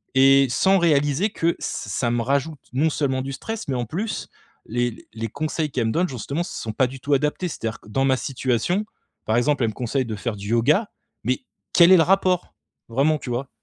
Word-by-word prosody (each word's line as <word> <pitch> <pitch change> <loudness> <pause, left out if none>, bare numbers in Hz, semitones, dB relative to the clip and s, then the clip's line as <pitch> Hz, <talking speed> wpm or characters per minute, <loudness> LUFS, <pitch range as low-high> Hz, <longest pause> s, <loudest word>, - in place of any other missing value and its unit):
et 135 +1 +6
sans 195 +8 +4
réaliser 150 +3 +2
que 165 +1 +1
ç - - -18
ça 115 +4 -2
me 120 - +1
rajoute 140 +4 -1
non 150 +5 +2
seulement 130 -3 0
du 135 - -5
stress, 225 +8 -5
mais 135 - 0
en 120 -1 -1
plus 195 - -4 0.4
les 120 0 -2
les 115 0 -3
conseils 155 +2 -2
qu'elle 120 -4 0
me - - 0
donne 180 +1 +1
justement 140 +6 -3
sont 110 - -5
pas 130 - +3
du 130 +1 -9
tout 145 - 0
adaptés. 150 +6 +1
C'est-à-dire 115 -6 -4
que - - -16
dans 135 +5 +1
ma 130 -1 +3
situation, 135 - -1 0.4
par 110 - +1
exemple 140 +1 +2
elle 115 - +2
me - - -16
conseille 130 +2 -1
de 110 - -4
faire 105 +2 -3
du 100 +1 -7
yoga, 145 - +2 0.3
mais 125 +3 0 0.3
quel 170 +1 +7
est - - +10
le 165 - +6
rapport? 185 0 +2 0.4
Vraiment, 140 +6 +2
tu 125 - -7
vois? 130 +3 -2
135 Hz, 215 wpm, -23 LUFS, 120-160 Hz, 0.4 s, est